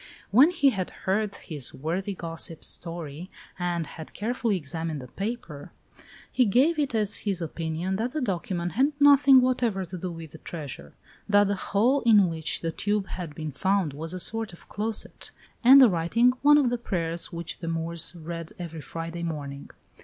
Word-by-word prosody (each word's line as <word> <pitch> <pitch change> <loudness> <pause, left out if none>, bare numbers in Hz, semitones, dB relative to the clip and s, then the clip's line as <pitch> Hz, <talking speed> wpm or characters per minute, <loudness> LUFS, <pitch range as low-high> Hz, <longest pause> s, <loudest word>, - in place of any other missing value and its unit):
When 260 - +7
he 290 -6 +3
had 190 -6 -3 0.2
heard 200 +1 0
his 150 -10 -4
worthy 185 +7 -3
gossip's 165 -1 -3
story 165 0 -4 0.3
and 175 -2 -1
had 160 +1 -10
carefully 225 -1 -1
examined 160 0 -4
the 125 - -9
paper, 195 - -6 0.6
he 255 - +3
gave 270 - +3
it 280 -5 0
as 215 -1 +3
his 195 -4 -2
opinion 165 +2 -3
that 235 +4 -2
the 310 - -1
document 180 - -2
had 275 +5 +2
nothing 280 -2 +7
whatever 240 -6 0
to 180 +1 -7
do 180 +1 -4
with 165 -2 -9
the 160 - -12
treasure; 140 - -8 0.3
that 205 0 +5
the 200 - +1
hole 230 +8 +1
in 210 -6 +5
which 160 -1 -2
the 165 - -2
tube 205 +3 -1
had 170 -5 -6
been 155 0 -5
found 190 0 0
was 160 +3 -5
a 185 - -5
sort 225 +1 -1
of 175 - -15
closet, 215 +1 -4 0.3
and 265 +3 +9
the 260 - +9
writing 200 +7 +3
one 295 +1 +7
of 265 -5 +3
the 245 - -1
prayers 170 -6 -3
which 170 -1 -5
the 165 - -6
Moors 165 +1 -2
read 165 0 -7
every 165 -3 -7
Friday 165 +2 -6
morning. 145 -4 -5
180 Hz, 180 wpm, -26 LUFS, 165-225 Hz, 0.6 s, and